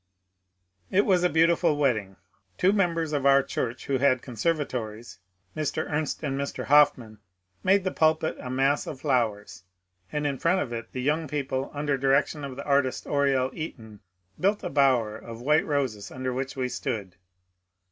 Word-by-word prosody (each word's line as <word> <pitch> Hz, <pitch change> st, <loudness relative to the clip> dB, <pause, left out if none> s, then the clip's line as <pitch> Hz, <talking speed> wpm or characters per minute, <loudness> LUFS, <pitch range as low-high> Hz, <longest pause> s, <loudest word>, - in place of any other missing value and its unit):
It 200 Hz, +2 st, +3 dB
was 185 Hz, -3 st, +3 dB
a 180 Hz, -, +4 dB
beautiful 165 Hz, -1 st, +3 dB
wedding. 110 Hz, -9 st, 0 dB, 0.4 s
Two 190 Hz, +2 st, +3 dB
members 165 Hz, -6 st, 0 dB
of 145 Hz, -2 st, 0 dB
our 140 Hz, 0 st, +5 dB
church 125 Hz, -1 st, -4 dB
who 135 Hz, -2 st, 0 dB
had 130 Hz, -2 st, +3 dB
conservatories, 120 Hz, -, -3 dB, 0.4 s
Mr. 155 Hz, -2 st, -2 dB
Ernst 150 Hz, +1 st, -2 dB
and 135 Hz, -2 st, -2 dB
Mr. 140 Hz, -, -4 dB
Hofmann, 135 Hz, -7 st, +3 dB, 0.4 s
made 195 Hz, +1 st, +4 dB
the 185 Hz, -, -1 dB
pulpit 160 Hz, 0 st, +2 dB
a 125 Hz, -, -7 dB
mass 135 Hz, +3 st, +1 dB
of 135 Hz, -, -7 dB
flowers, 110 Hz, -, -1 dB, 0.5 s
and 150 Hz, 0 st, -2 dB
in 140 Hz, -3 st, -1 dB
front 180 Hz, +3 st, +2 dB
of 120 Hz, -8 st, -3 dB
it 115 Hz, -1 st, -6 dB
the 125 Hz, -, -4 dB
young 155 Hz, +3 st, 0 dB
people, 135 Hz, -2 st, -2 dB
under 145 Hz, -2 st, -1 dB
direction 140 Hz, +2 st, +1 dB
of 135 Hz, -2 st, -6 dB
the 140 Hz, -, -7 dB
artist 140 Hz, -2 st, +1 dB
Oriel 135 Hz, -2 st, +1 dB
Eaton, 110 Hz, -10 st, -8 dB, 0.4 s
built 200 Hz, +3 st, +1 dB
a -, -, -4 dB
bower 130 Hz, -6 st, +3 dB
of 115 Hz, +1 st, -9 dB
white 150 Hz, +6 st, +2 dB
roses 130 Hz, -9 st, -1 dB
under 130 Hz, 0 st, -4 dB
which 135 Hz, +2 st, -4 dB
we 130 Hz, -1 st, -1 dB
stood. 100 Hz, -6 st, -4 dB
140 Hz, 165 wpm, -26 LUFS, 125-150 Hz, 0.5 s, our